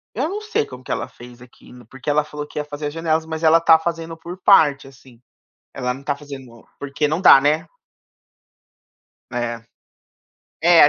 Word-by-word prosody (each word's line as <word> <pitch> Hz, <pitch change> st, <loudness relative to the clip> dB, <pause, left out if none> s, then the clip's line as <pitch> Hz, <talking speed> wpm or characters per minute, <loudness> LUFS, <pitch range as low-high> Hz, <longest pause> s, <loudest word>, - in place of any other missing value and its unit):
Eu 265 Hz, +7 st, 0 dB
não 405 Hz, +5 st, -5 dB
sei 430 Hz, +1 st, -1 dB
como 125 Hz, 0 st, -12 dB
que -, -, -7 dB
ela 115 Hz, -, -2 dB
fez 120 Hz, -1 st, -14 dB
aquilo. 125 Hz, -1 st, -16 dB
Porque 135 Hz, +5 st, -8 dB
ela 150 Hz, +1 st, +2 dB
falou 150 Hz, 0 st, -7 dB
que -, -, -12 dB
ia 150 Hz, -, -3 dB
fazer 150 Hz, 0 st, -5 dB
as 145 Hz, -, -6 dB
janelas 160 Hz, -1 st, 0 dB
mas 160 Hz, 0 st, -6 dB
ela 160 Hz, +1 st, +6 dB
está 165 Hz, -1 st, +6 dB
fazendo 165 Hz, 0 st, -5 dB
por 175 Hz, +3 st, -9 dB
parte, 145 Hz, -9 st, +4 dB
assim. 130 Hz, -3 st, -18 dB, 0.5 s
Ela 125 Hz, -1 st, -2 dB
não 135 Hz, -, -11 dB
tá 145 Hz, -, 0 dB
fazendo 135 Hz, -5 st, -12 dB
porque 145 Hz, +1 st, -2 dB
não 155 Hz, +4 st, -1 dB
dá, 180 Hz, -7 st, +8 dB
né. 150 Hz, +3 st, +1 dB, 1.7 s
É. 120 Hz, -1 st, -3 dB, 1.0 s
É, 170 Hz, -1 st, +7 dB
a 145 Hz, -, +8 dB
150 Hz, 190 wpm, -20 LUFS, 130-165 Hz, 1.7 s, dá